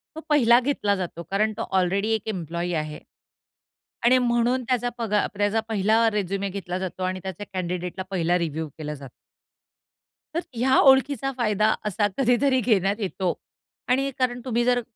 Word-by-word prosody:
तो - - -5
पहिला 240 -5 +6
घेतला 245 -6 0
जातो 175 -2 -5
कारण 215 +2 +1
तो - - -3 0.2
ऑलरेडी 195 +4 0
एक 220 - -6
एम्प्लॉयी 175 -2 -3
आहे. 155 -1 -3 1.1
आणि 255 +2 +6
म्हणून 245 +1 +1
त्याचा 245 0 0
पगार 210 -3 0
प्रे 205 0 -2
त्याचा 210 +2 +2
पहिला 220 +2 +3
रेझ्युमे 195 -1 -2
घेतला 180 -2 -4
जातो 185 0 -4
आणि 185 0 -2
त्याचे 190 +1 -6
कँडिडेटला 180 0 -3
पहिला 175 -1 +1
रिव्ह्यू 160 -2 -3
केला 150 -1 -5
जातो. 140 -3 -10 1.3
तर 340 - +1
ह्या 260 +3 +2
ओळखीचा 270 0 +4
फायदा 215 -2 +2
असा 205 0 +1
कधीतरी 260 +1 +3
घेण्यात 200 -4 +2
येतो 190 -3 -1 0.5
आणि 270 +2 +2
कारण 250 -1 0
तुम्ही 240 -2 +1
जर 245 0 +3
210 Hz, 155 wpm, -24 LUFS, 185-245 Hz, 1.3 s, पहिला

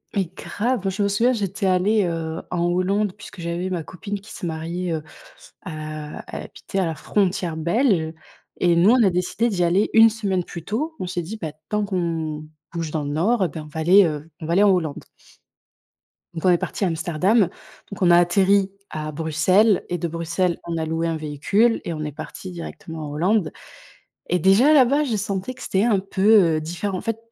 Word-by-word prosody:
Mais 195 -2 +2
grave, 240 +5 -2
moi 195 - 0
je 200 +2 -1
me 200 - +2
souviens, 230 +6 +2
j'étais 200 -3 -2
allée, 195 +3 +3
heu, 165 -1 -3
en 175 -1 -1
Hollande 185 +3 +1
puisque 180 - -11
j'avais 170 +2 -3
ma 175 -3 -2
copine 200 +6 -6
qui 205 +3 -15
se - - -11
mariait, 170 +2 -3
heu, 155 -2 -3 0.6
à 155 -3 -7
elle - - -4
habitait 195 - -7
à - - +2
la 165 -2 -2
frontière 180 0 -1
belge 170 - +1 0.5
et 175 -1 +3
nous 175 +5 +5
on 250 0 +5
a 205 - +5
décidé 180 +6 0
d'y 185 -5 0
aller 180 +5 +2
1 225 0 +8
semaine 200 -5 -1
plus 170 -1 -9
tôt. 300 +10 -2
On 185 - -2
s'est 175 0 -3
dit, 205 +7 -7
beh, 160 -3 -4 0.2
tant 210 -1 0
qu'on 165 -5 -2 0.3
bouge 165 -2 -3
dans 150 -1 -2
le - - -4
nord 195 +10 +1
eh - - 0
ben 160 0 -7
on - - -12
va 160 +1 -5
aller, 185 +5 +6
heu, 155 -1 -3
on - - -7
va 170 - -1
aller 195 - +4
en 205 - +6
Hollande. 165 -6 0 1.3
Donc 165 0 -5
on - - +6
est 175 - +5
parti 200 - -4
à - - +2
Amsterdam 175 +6 +1
donc 200 +2 -6
on 175 -2 +5
a 170 - +7
atterri 190 +2 +3 0.2
à 155 0 -4
Bruxelles 165 +7 +2
et 175 - -1
de 170 - -2
Bruxelles 170 +2 -1
on 170 -1 -3
a 160 - -1
loué 165 +1 -1
un 165 -1 -1
véhicule 155 +10 +1
et 170 - -2
on 155 -1 -4
est 150 - -4
parti 185 +5 -8
directement 165 -2 -7
en - - -7
Hollande 175 +4 +1 0.8
et 180 - +2
déjà 195 - +5
là-bas 285 +1 +5
je 235 -6 -1
sentais 200 +4 -3
que 255 - -12
c'était 195 +2 +1
un 215 -5 +3
peu, 195 -3 +4
heu, - - -1
différent. 175 +5 -3
En - - -4
fait, 225 0 -2
180 Hz, 215 wpm, -22 LUFS, 165-205 Hz, 1.3 s, 1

